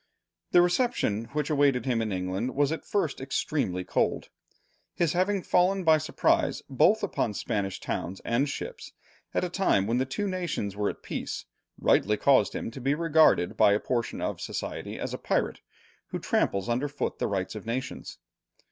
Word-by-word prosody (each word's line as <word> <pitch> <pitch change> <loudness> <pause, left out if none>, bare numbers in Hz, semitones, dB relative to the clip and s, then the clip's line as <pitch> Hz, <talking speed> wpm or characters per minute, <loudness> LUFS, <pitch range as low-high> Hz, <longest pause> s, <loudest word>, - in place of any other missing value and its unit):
The 175 - +6
reception 175 - +1
which 150 +4 -3
awaited 140 -5 +3
him 120 -3 +1
in 110 -2 -2
England 95 +6 -2
was 145 +1 +2
at 160 - -3
first 165 -10 -1
extremely 135 - -1
cold. - - 0 0.7
His 170 -3 +1
having 185 +1 +1
fallen 185 +2 +2
by 160 -2 +5
surprise 155 - +1
both 185 - +3
upon 115 - -1
Spanish 100 -4 -2
towns 95 +3 -4
and 130 +5 0
ships, 480 - -6 0.4
at - - +2
a - - +1
time 175 - +2
when 115 +4 +1
the 130 - 0
two 170 +11 -2
nations 175 - -3
were 105 0 0
at - - -8
peace, - - -4 0.3
rightly 105 +1 +3
caused 130 -5 +3
him - - -4
to 130 - -9
be 135 +3 +1
regarded 160 - +4
by 100 - +5
a 105 - +2
portion 120 -1 -2
of - - -3
society - - -5
as - - -4
a - - -4
pirate, - - -1 0.5
who - - -4
tramples 95 -1 0
under 125 +5 0
foot 145 0 -3
the - - 0
rights 95 -2 -2
of 105 0 -8
nations. 125 +3 -4
135 Hz, 175 wpm, -28 LUFS, 105-165 Hz, 0.7 s, The